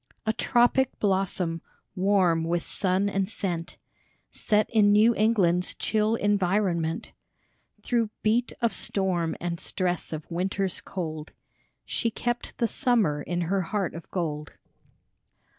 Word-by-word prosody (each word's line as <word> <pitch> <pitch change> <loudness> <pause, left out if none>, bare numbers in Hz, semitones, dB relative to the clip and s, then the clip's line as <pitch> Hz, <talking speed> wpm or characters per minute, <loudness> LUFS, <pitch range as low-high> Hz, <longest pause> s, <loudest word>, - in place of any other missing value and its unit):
A 220 - +1
tropic 245 +3 +2
blossom, 190 -4 0 0.3
warm 185 -4 +3
with 170 +1 -1
sun 190 +1 +1
and 195 -1 -1
scent, 175 -5 -4 0.5
Set 210 0 +1
in 210 -3 +5
New 215 +3 +5
England's 195 -6 +2
chill 215 +1 +1
environment; 190 -5 0 0.7
Through 235 -3 +1
beat 230 +3 +2
of 235 -3 +2
storm 180 -4 -1
and 170 -1 -3
stress 180 -2 -2
of 155 -1 -5
winter's 190 +2 -1
cold, 155 -4 -5 0.5
She 230 - -1
kept 240 +2 -3
the 235 - +2
summer 220 - +1
in 175 +3 -2
her 190 +3 0
heart 190 +1 -2
of 165 - -9
gold. 150 -5 -3
190 Hz, 125 wpm, -26 LUFS, 170-215 Hz, 0.7 s, in